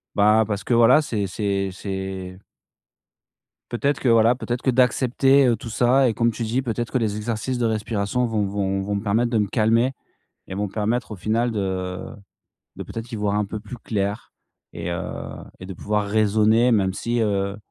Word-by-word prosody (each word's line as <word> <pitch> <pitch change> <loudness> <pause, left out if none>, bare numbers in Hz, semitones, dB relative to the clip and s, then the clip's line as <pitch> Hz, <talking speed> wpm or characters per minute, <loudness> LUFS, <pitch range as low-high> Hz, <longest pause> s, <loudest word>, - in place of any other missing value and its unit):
bah, 105 +2 +5
parce 105 -2 -3
que, 120 - 0
voilà, 120 +6 +6
c'est 110 -9 -2
c'est 100 0 -2
c'est 95 -1 -6 1.3
peut-être 140 +4 0
que, 130 - 0
voilà, 115 +1 +5
peut-être 120 0 -4
que 130 - +2
d'accepter, 130 +2 +3
heu, 120 -2 +3
tout 115 +2 -8
ça 125 +3 +3
et 115 - -1
comme 115 +1 +2
tu 115 - -5
dis, 120 +4 -1
peut-être 120 -1 -3
que 130 - +2
les 105 -3 -1
exercices 115 +3 -3
de 120 - +1
respiration 110 +2 -1
vont 110 -3 0
vont 95 -1 -1
vont 100 +1 -2
me 100 - -3
permettre 115 +3 +1
de 115 - +1
me 105 -2 +1
calmer 115 +4 +2 0.6
et 95 - -6
vont 105 +1 -1
me - - -13
permettre 110 +2 -1
au - - -4
final 115 +5 0
de, 110 - -2
heu, 95 0 -4 0.6
de - - -5
peut-être 115 +2 -7
y - - -3
voir 105 -1 -1
un 105 - +1
peu 105 +2 -6
plus 110 +4 -9
clair 100 -2 -3 0.4
et 85 +1 -5
heu, 85 - -2 0.6
de 95 +1 -7
pouvoir 105 +3 -1
raisonner 110 +3 +3
même 95 -4 +2
si, 120 +4 -2
heu 100 -2 0
110 Hz, 195 wpm, -23 LUFS, 100-120 Hz, 1.3 s, voilà